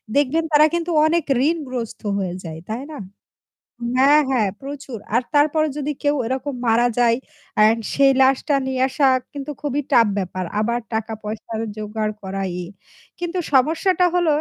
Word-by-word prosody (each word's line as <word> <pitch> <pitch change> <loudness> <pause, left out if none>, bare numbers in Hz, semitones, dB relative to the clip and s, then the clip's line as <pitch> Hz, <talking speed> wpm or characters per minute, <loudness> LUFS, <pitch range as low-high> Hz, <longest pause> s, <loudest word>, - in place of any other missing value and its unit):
দেখবেন 290 +3 +2
তারা 300 0 +6
কিন্তু 345 0 -1
অনেক 330 0 +2 0.3
ঋণগ্রস্ত 255 -8 -4 0.2
হয়ে 185 -3 -2
যায়। 160 -2 -7
তাই 230 +4 -3
না - - -7 1.0
হ্যাঁ, 285 +3 +6
হ্যাঁ, 225 -6 +2
প্রচুর। 275 -3 -7 0.2
আর 240 - +3
তারপরে 310 +1 +3
যদি 295 +1 -2
কেউ 290 0 +2
এরকম 260 +3 -3
মারা 235 +2 +4
যায় 235 -1 +4 0.4
অ্যান্ড 220 +2 +5
সেই 275 -1 +5
লাশটা 270 +3 +2
নিয়ে 260 -1 -1
আসা 270 +1 +2 0.2
কিন্তু 285 0 -6
খুবই 290 -1 -1
টাফ 235 -3 +6
ব্যাপার। 185 -1 -3 0.2
আবার 235 +2 0
টাকা 220 0 -2
পয়সা 215 +2 -6 0.2
জোগাড় 215 0 -3
করা 195 0 -4 0.2
ই। - - -6 0.5
কিন্তু 350 +1 -3
সমস্যাটা 330 +7 +3
হল 350 -1 +2
265 Hz, 155 wpm, -21 LUFS, 225-295 Hz, 1.0 s, তারা